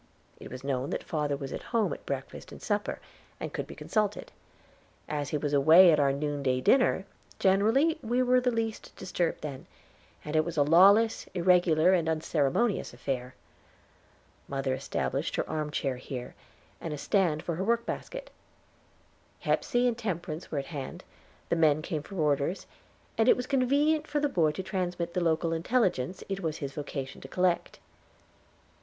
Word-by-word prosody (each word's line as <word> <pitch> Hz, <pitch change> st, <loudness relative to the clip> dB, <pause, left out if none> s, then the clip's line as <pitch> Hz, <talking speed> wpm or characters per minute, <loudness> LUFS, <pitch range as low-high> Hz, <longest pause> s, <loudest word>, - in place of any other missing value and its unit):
It -, -, -10 dB
was 130 Hz, +1 st, -8 dB
known 135 Hz, -1 st, -2 dB
that -, -, -3 dB
father 150 Hz, -3 st, -1 dB
was 135 Hz, -1 st, -6 dB
at -, -, -5 dB, 0.2 s
home 220 Hz, -, +1 dB
at -, -, -11 dB
breakfast -, -, -5 dB
and -, -, -10 dB
supper, 205 Hz, -2 st, -2 dB, 0.4 s
and -, -, -5 dB
could -, -, -4 dB
be -, -, -10 dB
consulted. 210 Hz, -2 st, -2 dB, 0.8 s
As 145 Hz, -2 st, -3 dB
he 150 Hz, -, 0 dB
was 145 Hz, 0 st, -2 dB
away 160 Hz, +6 st, +8 dB
at 155 Hz, -, +3 dB
our 140 Hz, -1 st, +3 dB
noonday 140 Hz, -2 st, -1 dB
dinner, 235 Hz, -, +3 dB, 0.3 s
generally 225 Hz, -, +3 dB
we 240 Hz, +3 st, +1 dB
were 250 Hz, 0 st, +4 dB
the 250 Hz, -, +2 dB
least 225 Hz, -2 st, -3 dB
disturbed 180 Hz, -2 st, -2 dB
then, 140 Hz, -3 st, -7 dB, 0.6 s
and 150 Hz, +1 st, -4 dB
it 155 Hz, -, +4 dB
was 170 Hz, 0 st, -6 dB
a 145 Hz, -, +5 dB
lawless, 200 Hz, +9 st, +5 dB
irregular, 175 Hz, -1 st, +4 dB
and 165 Hz, -3 st, +2 dB
unceremonious 160 Hz, -, 0 dB
affair. 125 Hz, 0 st, -4 dB, 1.1 s
Mother 135 Hz, -1 st, -1 dB
establisher 130 Hz, -, -2 dB
her -, -, -1 dB
arm 155 Hz, -1 st, -2 dB
chair 135 Hz, -3 st, -2 dB
here, 125 Hz, -1 st, -7 dB, 0.5 s
and 155 Hz, -2 st, -4 dB
a -, -, -8 dB
stand 165 Hz, -1 st, +1 dB
for 170 Hz, -, -2 dB
her 190 Hz, -, -1 dB
workbasket. 235 Hz, -, -2 dB, 1.1 s
Hepsey 245 Hz, +1 st, +1 dB
and 240 Hz, -, +1 dB
Temperance 175 Hz, -7 st, -4 dB
were 150 Hz, -, -3 dB
at 140 Hz, -, -2 dB
hand, 140 Hz, -3 st, -6 dB, 0.5 s
the -, -, +2 dB
men 155 Hz, -2 st, +3 dB
came 155 Hz, -3 st, -3 dB
for 195 Hz, +6 st, -11 dB
orders, 150 Hz, +1 st, 0 dB, 0.5 s
and 225 Hz, -, +5 dB
it -, -, +6 dB
was 250 Hz, -, -3 dB
convenient 285 Hz, +4 st, +2 dB
for 295 Hz, -, -1 dB
the 290 Hz, -, +2 dB
boy 170 Hz, -, +2 dB
to 190 Hz, -, -5 dB
transmit 175 Hz, -2 st, -3 dB
the 180 Hz, -, 0 dB
local 165 Hz, 0 st, +1 dB
intelligence 180 Hz, -, 0 dB
it 195 Hz, 0 st, -3 dB
was 160 Hz, -4 st, -3 dB
his 140 Hz, -2 st, -5 dB
vocation 140 Hz, -2 st, -6 dB
to -, -, -9 dB
collect. 180 Hz, +3 st, 0 dB
170 Hz, 170 wpm, -29 LUFS, 145-205 Hz, 1.1 s, away